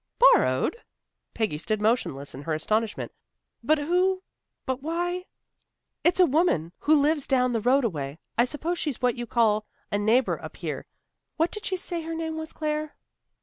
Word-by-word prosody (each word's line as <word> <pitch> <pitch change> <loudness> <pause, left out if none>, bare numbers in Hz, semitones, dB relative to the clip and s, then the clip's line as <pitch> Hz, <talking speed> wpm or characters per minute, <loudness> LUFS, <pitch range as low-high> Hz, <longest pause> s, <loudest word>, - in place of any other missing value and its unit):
"Borrowed!" 485 -1 +4 0.6
Peggy 215 -10 -1
stood 215 +5 -1
motionless 210 - 0
in 135 - -8
her 155 +2 -2
astonishment. 215 +7 -1 0.5
"But 310 +6 +3
who 365 +5 +1 0.4
but 260 -1 -2
why 350 +4 -2 0.4
" - - -56
"It's 355 +1 +3
a 365 - +8
woman 280 - +2
who 305 0 +4
lives 290 0 +2
down 255 -2 +3
the 230 -2 0
road 260 +4 +3
a - - +3
way. 140 -2 -5 0.2
I 235 - +4
suppose 325 +6 -3
she's 295 -6 -2
what 250 -1 +4
you 240 0 -5
call 215 -3 +2 0.2
a 205 - +1
neighbor 225 +5 +2
up - - -8
here. - - -5 0.5
What 325 +2 +2
did 425 +1 -5
she 375 - -1
say 350 -1 -3
her 325 0 -5
name 320 -1 -3
was, 315 0 -5
Claire?" 305 -1 -3
275 Hz, 180 wpm, -26 LUFS, 220-330 Hz, 0.6 s, a